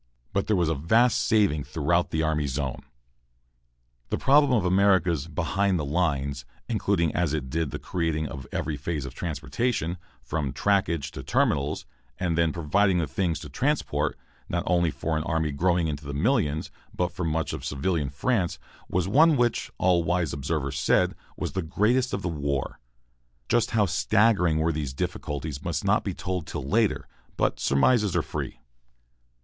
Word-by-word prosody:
But 100 - 0
there 110 - +3
was 85 -3 +2
a 80 - +2
vast 110 - +3
saving 100 -10 +3
throughout 85 +6 0
the 80 0 0
army 75 -2 0
zone. 65 -1 -3 1.3
The - - 0
problem 145 0 +4
of 110 -7 +2
America's 90 -5 +3
"behind 95 +4 0
the 75 - -2
lines," 70 -3 -1 0.2
including 100 -7 +1
as 80 -3 +1
it 65 -4 -4
did 80 -1 0
the - - -4
creating 80 -3 -2
of 65 -1 -8
every 75 -1 -2
phase 75 -1 -3
of 70 - -7
transportation, 85 - -2 0.2
from 70 0 -2
trackage 85 -3 +1
to - - -7
terminals, 75 +1 0 0.3
and 85 -3 0
then 85 -1 +2
providing 90 +5 +2
the 85 - +1
things 80 +4 -1
to 75 - -8
transport, 75 - 0 0.3
not 85 0 -1
only 85 -2 +2
for 75 +3 -2
an 80 - -1
army 80 -2 0
growing 85 +3 +1
into 75 -1 -4
the 70 - -4
millions, 80 - +1 0.2
but 90 +1 0
for 90 - -5
much 80 -1 -1
of - - -5
civilian 70 +2 -1
France, 90 - 0 0.3
was 90 0 0
one 150 +8 +5
which, 120 -1 +1
all 90 -2 +3
wise 85 -2 0
observers 70 -1 -2
said, - - +3 0.2
was - - -3
the 95 - -2
greatest 110 +10 +1
of 100 - -3
the - - -1
war. 70 -5 -2 0.7
Just 120 -1 +2
how 110 -3 +3
staggering 95 -1 +3
were 80 +1 +2
these 75 -4 -4
difficulties 75 +1 -4
must - - -2
not - - +3
be - - -3
told 90 -4 -3
till - - -4
later, 110 +4 +1 0.3
but - - +1
surmises 100 - +3
are 85 - +2
free. - - -5
85 Hz, 170 wpm, -26 LUFS, 75-95 Hz, 1.3 s, one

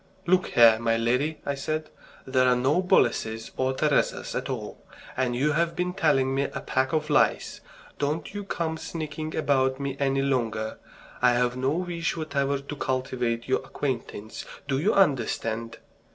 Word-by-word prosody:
"Look 185 +1 +3
here, 115 -2 +6
my 115 0 +1
lady," 125 +7 +1
I 140 - 0
said, 155 +3 -3 0.3
"there 130 -1 +3
are 125 - +5
no 135 +8 +2
Boleses 115 - +1
or 130 0 0
Teresas 150 0 +1
at - - -3
all, - - -5 0.3
and 125 -2 0
you've 150 +5 +1
been 180 +1 -1
telling 135 -8 +2
me 140 +1 +1
a - - -5
pack 130 +1 0
of 155 -1 -1
lies. 145 - +2 0.4
Don't 150 +5 -2
you 205 0 -4
come 165 -4 -2
sneaking 155 -1 -5
about 130 -3 +1
me 140 -1 -3
any 135 -1 +1
longer. 115 -5 -1 0.4
I 125 -1 +5
have 120 0 +1
no 130 +1 0
wish 170 +1 -2
whatever 140 -3 0
to 140 +2 -7
cultivate 130 -3 -2
your 130 - +2
acquaintance. 120 -5 -5 0.2
Do 135 -1 0
you 195 +9 +2
understand?" 115 - +1
135 Hz, 160 wpm, -26 LUFS, 125-155 Hz, 0.4 s, here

